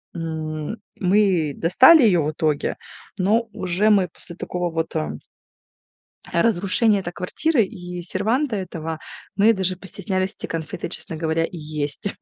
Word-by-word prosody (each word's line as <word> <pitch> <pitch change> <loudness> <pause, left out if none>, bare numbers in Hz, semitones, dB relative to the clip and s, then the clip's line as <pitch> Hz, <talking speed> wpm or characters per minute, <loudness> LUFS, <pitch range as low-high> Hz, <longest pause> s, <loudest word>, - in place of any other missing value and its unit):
м. 160 +2 -4 0.2
Мы 185 -5 +2
достали 260 - +7
ее 185 -7 +4
в 150 +1 -1
итоге, 155 -1 0 0.4
но 220 +5 +2
уже 185 +4 +1
мы 195 -4 +4
после 170 - -10
такого 180 0 -3
вот, 165 0 -2
э 75 -1 -1 1.2
разрушения 200 +2 +3
это 175 -2 -5
квартиры 240 - +1
и 180 -4 -7
серванта 220 - 0
этого, 165 -4 -5 0.4
мы 215 +3 +5
даже 190 -2 0
постеснялись 190 0 -3
эти - - -4
конфеты, 160 -2 -4
честно 165 - -5
говоря, 160 0 0
и 175 - -9
есть. 150 +4 -3
180 Hz, 140 wpm, -22 LUFS, 160-205 Hz, 1.2 s, достали